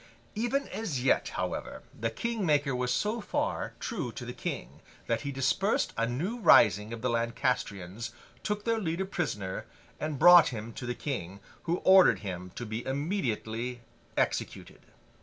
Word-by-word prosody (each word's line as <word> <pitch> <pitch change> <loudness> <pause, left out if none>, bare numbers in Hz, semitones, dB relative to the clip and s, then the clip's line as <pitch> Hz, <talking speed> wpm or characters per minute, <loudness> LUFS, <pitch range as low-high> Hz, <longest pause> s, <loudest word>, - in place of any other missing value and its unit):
Even 240 +6 0
as 160 - -3
yet, 135 - +3
however, - - -4
the 115 +1 -2
King 230 - -3
Maker 145 -5 +2
was 125 0 -1
so 220 +3 0
far - - -2
true - - -3
to - - -7
the - - -5
King, 65 +4 -5 0.2
that 115 -1 0
he 140 - -3
dispersed 140 - +1
a 115 0 +1
new 175 - -2
rising 110 - +6
of 115 0 -6
the 125 - +1
Lancastrians, 115 -3 -2 0.3
took 210 0 -3
their 230 -1 +1
leader 175 -1 -1
prisoner, 105 - -3 0.3
and 155 -2 -3
brought 175 +2 +9
him 115 -1 -5
to 125 - -6
the 120 - -2
King, 100 - -4 0.3
who 170 +1 +1
ordered 190 0 +7
him 90 -3 -5
to 120 - -5
be 110 +2 -4
immediately 125 - -2 0.4
executed. - - -2
130 Hz, 160 wpm, -29 LUFS, 115-190 Hz, 0.4 s, brought